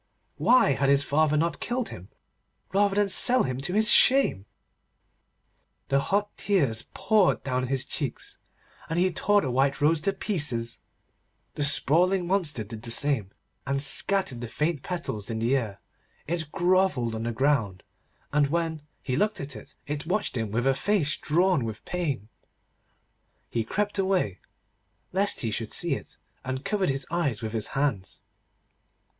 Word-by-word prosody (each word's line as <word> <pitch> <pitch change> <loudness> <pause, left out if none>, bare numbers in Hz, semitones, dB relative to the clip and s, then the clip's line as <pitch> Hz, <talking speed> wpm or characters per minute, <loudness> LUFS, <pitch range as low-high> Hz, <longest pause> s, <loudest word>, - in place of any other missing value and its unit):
Why 225 - +4
had 135 0 +1
his 140 0 +4
father 150 +1 +2
not 160 -1 0
killed 245 0 -2
him, 90 +2 -10 0.6
rather 200 0 +2
than 205 0 +3
sell 245 +5 +4
him 130 0 -3
to 180 +6 -3
his 215 +2 +2
shame? 250 - +4 1.4
The 140 - +3
hot 205 +7 -1
tears 140 - +1
poured 215 -4 +2
down 130 -1 -1
his 135 0 0
cheeks, 140 -2 -5 0.5
and 160 - -2
he 185 +1 +3
tore 205 +3 +3
the 130 - -2
white 135 +2 +1
rose 150 +2 +2
to 195 +4 0
pieces. 145 - 0 0.7
The 150 - -2
sprawling 175 +6 +3
monster 170 - 0
did 110 +1 -9
the 115 - -6
same, 120 -5 +1 0.4
and 140 0 0
scattered 145 -2 +1
the 120 - -4
faint 150 +4 -1
petals 170 - -5
in 115 - -3
the 115 +4 +1
air. 110 -7 -3 0.5
It 160 -2 -3
grovelled 175 -10 +1
on 110 - -4
the 115 +1 -2
ground, 115 -7 0 0.5
and, 145 -1 +3
when 165 0 -2 0.2
he 130 - -2
looked 210 +9 0
at 140 -2 -6
it, 105 - -12
it 150 +1 -4
watched 205 -1 -1
him 115 -3 -2
with 120 +4 -1
a 135 - +4
face 155 -3 +1
drawn 175 -1 +1
with 110 -2 -6
pain. 145 - -3 1.2
He 115 - 0
crept 205 - -2
away, 185 - 0 0.7
lest 195 +2 0
he 115 - -1
should 110 0 -3
see 170 -4 +1
it, - - -7 0.3
and 130 +1 -4
covered 200 -5 0
his 135 -1 -1
eyes 145 -11 -1
with 110 0 -4
his 110 -2 -2
hands. 125 -10 -2
145 Hz, 160 wpm, -26 LUFS, 120-185 Hz, 1.4 s, Why